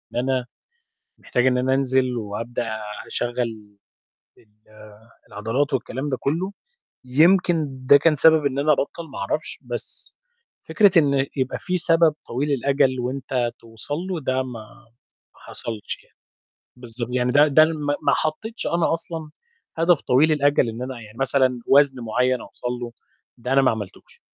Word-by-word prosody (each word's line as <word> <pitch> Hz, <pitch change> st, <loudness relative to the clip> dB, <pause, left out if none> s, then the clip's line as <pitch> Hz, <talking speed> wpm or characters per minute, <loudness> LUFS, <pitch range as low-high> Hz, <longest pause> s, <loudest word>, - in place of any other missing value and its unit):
أنا 130 Hz, 0 st, 0 dB, 0.7 s
محتاج 125 Hz, +1 st, 0 dB
إن 125 Hz, -1 st, +3 dB
أنا 130 Hz, +1 st, +1 dB
أنزل 130 Hz, -2 st, +1 dB
وأبدأ 115 Hz, +1 st, -4 dB, 0.3 s
أشغّل 115 Hz, -4 st, -4 dB, 0.6 s
ال -, -, -24 dB, 0.8 s
العضلات 115 Hz, +8 st, -2 dB
والكلام 130 Hz, +2 st, -3 dB
ده 130 Hz, -3 st, -1 dB
كلّه، 170 Hz, +8 st, -1 dB, 0.5 s
يمكن 165 Hz, +3 st, +3 dB, 0.2 s
ده 140 Hz, +2 st, +8 dB
كان 155 Hz, +2 st, +3 dB
سبب 160 Hz, 0 st, +5 dB
إن 140 Hz, 0 st, 0 dB
أنا 150 Hz, +2 st, +3 dB
أبطّل، 160 Hz, +3 st, -2 dB
ما -, -, -7 dB
أعرفش. 100 Hz, +11 st, -3 dB
بس -, -, -4 dB, 0.5 s
فكرة 205 Hz, -3 st, +5 dB
إن 140 Hz, -3 st, +2 dB
يبقى 130 Hz, -1 st, -1 dB
في 180 Hz, -1 st, -2 dB
سبب 165 Hz, -2 st, +3 dB
طويل 140 Hz, +5 st, -2 dB
الأجل، 135 Hz, 0 st, +1 dB
وأنت 125 Hz, -1 st, -2 dB
توصل 115 Hz, +5 st, -6 dB
له، 180 Hz, 0 st, -4 dB
ده 130 Hz, -1 st, 0 dB
ما 125 Hz, -3 st, -8 dB, 0.7 s
ما -, -, -23 dB
حصلش. 110 Hz, -3 st, -5 dB
يعني -, -, -31 dB, 0.6 s
بالضب 120 Hz, 0 st, -6 dB
يعني 125 Hz, 0 st, +1 dB
ده 145 Hz, +3 st, +6 dB
ده 155 Hz, +2 st, +6 dB
ما 150 Hz, -3 st, -2 dB
ما -, -, +3 dB
حطّيتش 215 Hz, +9 st, -2 dB
أنا 170 Hz, -1 st, +1 dB
أصلًا 160 Hz, -2 st, -6 dB, 0.5 s
هدف 165 Hz, -1 st, +3 dB
طويل 145 Hz, +5 st, +3 dB
الأجل، 145 Hz, -4 st, +2 dB
إن 115 Hz, +2 st, -7 dB
أنا 125 Hz, -2 st, -6 dB
يعني 110 Hz, +1 st, -14 dB
مثلًا 130 Hz, -2 st, +2 dB
وزن 135 Hz, -2 st, +4 dB
معيّن 125 Hz, +2 st, 0 dB
أوصل -, -, -8 dB
له، 120 Hz, -, -5 dB, 0.5 s
ده 125 Hz, +2 st, -3 dB
أنا 135 Hz, -, +5 dB
ما 135 Hz, -, +4 dB
عملتوش. 105 Hz, -4 st, -8 dB
130 Hz, 150 wpm, -23 LUFS, 120-150 Hz, 0.8 s, ده